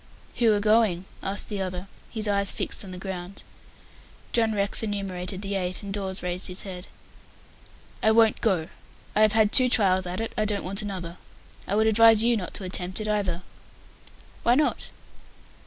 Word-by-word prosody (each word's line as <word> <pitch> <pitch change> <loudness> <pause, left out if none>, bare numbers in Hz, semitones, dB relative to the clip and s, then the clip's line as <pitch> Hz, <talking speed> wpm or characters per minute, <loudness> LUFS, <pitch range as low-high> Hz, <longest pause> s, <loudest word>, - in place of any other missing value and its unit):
"Who 230 -2 +4
are 205 - +1
going?" 210 -4 +2 0.2
asked 195 +1 -4
the 205 -2 -4
other, 185 0 -4 0.2
his 220 -2 -3
eyes 200 -1 +5
fixed - - -3
on 195 - -10
the 185 - -8
ground. 190 0 -7 0.9
John 225 -2 +2
Rex 200 0 +2
enumerated 195 -3 -4
the 200 0 -3
eight, 185 0 -2
and 200 -1 -6
Dawes 190 -2 -3
raised 180 +1 -2
his 185 -1 -6
head. 185 -2 -8 1.1
"I 220 - +3
won't 220 0 +4
go. 185 -8 +1 0.5
I 215 - +3
have 215 -1 +5
had 220 -1 +3
two 255 -1 +6
trials 190 -6 +4
at 180 +1 -4
it; 225 - -4
I 215 - 0
don't 205 -1 0
want 195 +3 -3
another. 185 -4 -6 0.5
I 200 - -1
would 220 +1 +3
advise 225 0 +6
you 235 0 +3
not 190 -5 -5
to - - -3
attempt 185 +1 -3
it 215 - -4
either." 195 -4 -1 1.0
"Why 240 - +3
not?" 295 +2 0
200 Hz, 180 wpm, -26 LUFS, 185-215 Hz, 1.1 s, two